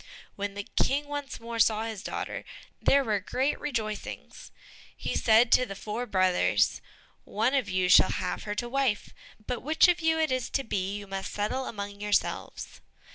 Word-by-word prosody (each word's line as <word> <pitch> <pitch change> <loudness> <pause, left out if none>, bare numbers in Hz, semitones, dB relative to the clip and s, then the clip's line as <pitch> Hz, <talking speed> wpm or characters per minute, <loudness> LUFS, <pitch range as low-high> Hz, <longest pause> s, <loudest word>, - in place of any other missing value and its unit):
When 200 0 -4
the 205 - -4
King 285 +7 0
once 290 -1 -5
more 230 0 -6
saw 220 -1 +3
his 220 -3 -5
daughter, - - -4 0.4
there 280 0 +4
were 215 -4 0
great 260 +9 -1
rejoicings. 220 -7 -5 0.5
He - - -3
said 225 +1 +4
to - - +6
the 195 - -6
four 220 +5 -4
brothers, 185 -3 +2 0.4
"One 225 +6 0
of 270 -3 +1
you 185 0 +1
shall 185 - +7
have 180 - -2
her 210 -1 -3
to 240 - -2
wife, 260 -4 -1 0.3
but 250 -2 -3
which 310 +5 +4
of 350 -1 +2
you 320 0 +2
it 315 -3 +1
is 255 -1 -1
to 275 - +1
be 195 -3 -2
you 205 - -8
must 195 0 -5
settle 215 +6 -2
among 200 -2 -6
yourselves." 210 0 -2
225 Hz, 180 wpm, -28 LUFS, 205-265 Hz, 0.5 s, shall